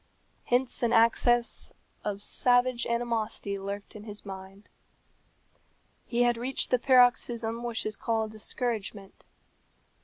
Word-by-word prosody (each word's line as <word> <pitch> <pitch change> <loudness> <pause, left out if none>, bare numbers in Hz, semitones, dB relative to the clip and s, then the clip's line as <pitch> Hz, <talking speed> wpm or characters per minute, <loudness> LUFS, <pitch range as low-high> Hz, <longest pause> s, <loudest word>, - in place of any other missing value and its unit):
Hence 245 +1 0
an 235 -1 +2
access 235 +1 +3 0.3
of 205 -1 -3
savage 245 +1 +2
animosity 230 -4 -2
lurked 200 +2 -6
in 210 0 -9
his 210 -1 -9
mind. 195 +1 -10 1.4
He 240 0 +2
had 240 -1 +2
reached 255 +3 -1
the 250 - +4
paroxysm 240 -3 +3
which 240 -1 -3
is 215 0 -3
called 220 -1 -1
discouragement. 215 -3 -4
230 Hz, 115 wpm, -28 LUFS, 210-240 Hz, 1.4 s, the